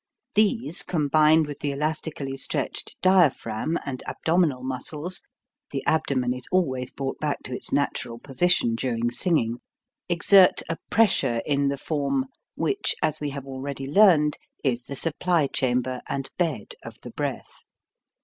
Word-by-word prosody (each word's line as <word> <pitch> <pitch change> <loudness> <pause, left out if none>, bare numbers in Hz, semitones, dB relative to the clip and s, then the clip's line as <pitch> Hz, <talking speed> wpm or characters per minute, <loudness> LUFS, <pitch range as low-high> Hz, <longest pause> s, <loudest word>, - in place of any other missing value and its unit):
These 210 -4 +2
combined 155 0 +3
with 145 -1 -7
the 145 - -2
elastically 150 -1 -3
stretched 135 - -3
dia 185 -4 +6
phragm 115 +5 -4
and 130 -2 -4
abdominal 160 -6 +1
muscles, 150 +7 -3 0.5
the 135 - -4
abdomen 130 -5 +1
is 125 -1 -4
always 130 -9 0
brought 135 -1 -5
back 150 -2 -2
to 125 - -5
its - - -3
natural 125 -4 -1
position 135 0 +1
during 120 0 -1
singing, 120 - +2 0.5
exert 180 +2 +5
a 165 - -3
pressure 190 - +2
in 140 -1 +1
the 140 0 -1
form, 155 - -1 0.3
which, 405 0 0
as 155 -1 +1
we 145 - -1
have 140 -1 -6
already 135 0 -5
learned, 150 -2 +5 0.3
is 125 -3 0
the 140 +3 -8
supply 165 +2 +1
chamber 125 -1 -1
and 135 -1 -3
bed 155 - -2
of - - -10
the - - -8
breath. - - -5
145 Hz, 145 wpm, -25 LUFS, 130-165 Hz, 0.5 s, dia